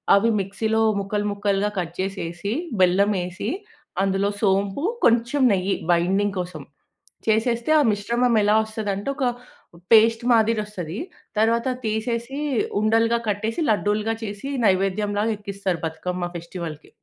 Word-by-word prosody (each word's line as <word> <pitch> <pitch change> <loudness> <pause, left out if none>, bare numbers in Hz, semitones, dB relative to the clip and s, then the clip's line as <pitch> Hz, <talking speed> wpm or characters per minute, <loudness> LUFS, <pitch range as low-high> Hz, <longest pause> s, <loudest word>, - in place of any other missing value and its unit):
అవి 210 +4 +3
మిక్సీలో 220 +3 0 0.2
ముక్కలు 205 +1 -2
ముక్కలుగా 200 0 0
కట్ 170 -1 -4
చేసేసి, 195 +1 -3 0.3
బెల్లం 190 +3 +4
వేసి, 180 +4 -4 0.5
అందులో 195 +1 +1
సోంపు 195 +6 +1 0.2
కొంచెం 235 +4 +3
నెయ్యి 190 +1 0 0.2
బైండింగ్ 190 +4 +2
కోసం 175 -5 -7 0.6
చేసేస్తే 235 +4 +1
ఆ - - +5
మిశ్రమం 235 +4 +1
ఎలా 210 +1 +4
వస్తదంటే 215 0 -3
ఒక 270 - -1 0.7
పేస్ట్ 225 +1 +6
మాదిరి 225 -1 +3
వస్తది 180 -4 -6 0.4
తరువాత 230 +3 +2 0.2
తీసేసి 235 +5 -2 0.4
ఉండలుగా 225 +2 +3
కట్టేసి 220 - -2
లడ్డూలుగా 210 +1 +1
చేసి 205 +5 -5 0.2
నైవేద్యం 195 +1 +1
లాగా 220 +2 +1
ఎక్కిస్తారు 200 -3 -3
బతుకమ్మ 175 +2 -3
ఫెస్టివల్‌కి. 170 -2 -7
205 Hz, 120 wpm, -23 LUFS, 190-225 Hz, 0.7 s, పేస్ట్